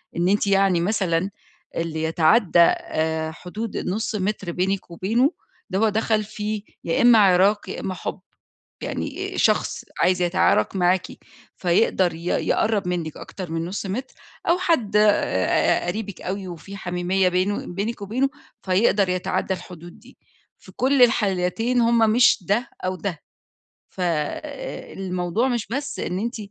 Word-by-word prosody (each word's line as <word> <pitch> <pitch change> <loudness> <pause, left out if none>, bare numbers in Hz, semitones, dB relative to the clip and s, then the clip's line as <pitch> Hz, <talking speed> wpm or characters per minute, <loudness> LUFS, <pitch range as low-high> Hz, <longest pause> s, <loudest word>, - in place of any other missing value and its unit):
إن 175 +1 +1
أنتِ 205 0 +2
يعني 195 -3 +3
مثلًا 190 -2 0 0.5
اللي 160 -1 -2
يتعدى 170 +4 +3
آآ 160 -1 +2
حدود 205 +7 -6
النُص 215 +4 -2
مِتر 200 -2 -2
بينِك 185 +1 -2
وبينه، 230 - +1 0.4
ده 190 - -1
هو 220 - +4
دخَل 215 0 +1
في 210 0 -4 0.2
يا 165 - 0
إمّا 240 -2 +7
عِراك 195 +1 +4
يا - - -5
إمّا 190 - -3
حُب. 185 - -5 0.6
يعني - - -4
شخص - - +1 0.2
عايز 180 0 +3
يتعارك 175 - +2
معاكِ 180 0 +2 0.5
فيقدَر 180 0 +2
ي 165 +1 -10
يقرّب 205 +2 +1
منِك 170 -3 -3
أكتر 185 -4 -8
من 165 0 -2
نُص 195 +3 -4
متر، 250 +8 -4 0.4
أو 345 - +4
حد 285 - +1
آآ 205 - +2
قَريبِك 200 +1 -4
أوي 190 0 -4
وفيه 175 +4 -9
حميمية 180 +1 0
بينه 185 +3 0
بينِك 205 +5 -4
وبينه 255 +7 0 0.3
فيقدَر 195 0 +2
يتعدى 185 +1 -1
الحدود 175 -1 -11
دي، - - -18 0.4
في 190 - -15
كُلّ 265 +1 +2
الحالتين 225 +2 +2
هُم 235 0 +3
مش 240 +2 +5
ده 215 +7 0 0.2
أو 185 - -1
ده. 175 -3 -4 0.7
فالموضوع 180 - -3
مش 240 -4 -1
بس 280 +5 -4
إن 180 +1 -2
أنتِ 235 +4 -3
190 Hz, 140 wpm, -23 LUFS, 175-215 Hz, 0.7 s, إمّا